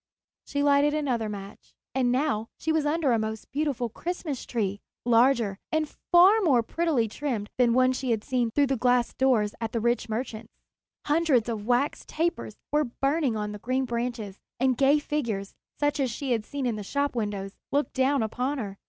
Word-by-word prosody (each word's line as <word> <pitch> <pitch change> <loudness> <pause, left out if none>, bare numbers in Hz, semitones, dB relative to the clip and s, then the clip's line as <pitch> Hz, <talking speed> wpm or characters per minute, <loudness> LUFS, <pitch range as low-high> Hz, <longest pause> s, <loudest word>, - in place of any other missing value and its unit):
She 285 0 -1
lighted 285 +1 +4
another 250 -8 -1
match. 200 -1 -9 0.2
And 255 -2 +2
now 250 -5 0
she 320 - -1
was 315 -2 +1
under 300 -3 +1
a 230 - +3
most 220 0 -5
beautiful 280 -4 -1
Christmas 310 - -5
tree, 205 -4 -1 0.3
larger 235 -4 +3
and 315 -1 +1 0.2
far 375 +5 +7
more 270 - +3
prettily 305 -4 0
trimmed 225 -3 -3
than 245 -1 +5
the - - +2
one 255 0 +5
she 260 0 -3
had 220 -2 0
seen 245 -3 0
through 285 +5 +2
the 270 0 0
glass 245 0 +2
doors 235 -6 +2
at 225 -1 -3
the 230 - 0
rich 235 +1 0
merchant's. 225 -1 -4 0.5
Hundreds 295 -7 +2
of 215 -2 -4
wax 250 +4 +1
tapers 335 +2 -2 0.2
were 300 0 +2
burning 275 -4 +1
on 210 0 -3
the 210 - -7
green 255 +4 -1
branches, 235 -4 -4 0.2
and 260 0 +3
gay 275 +3 +4
figures, 235 -10 -3 0.3
such 290 0 +1
as 265 -2 +1
she 260 +3 -4
had 225 -3 0
seen 280 -2 -3
in 235 -3 -1
the 210 - -5
shop 280 +6 -1
windows, 205 -3 -3 0.2
looked 285 +1 0
down 265 -1 +2
upon 255 +6 -2
her. 200 -5 -5
250 Hz, 190 wpm, -27 LUFS, 225-285 Hz, 0.5 s, far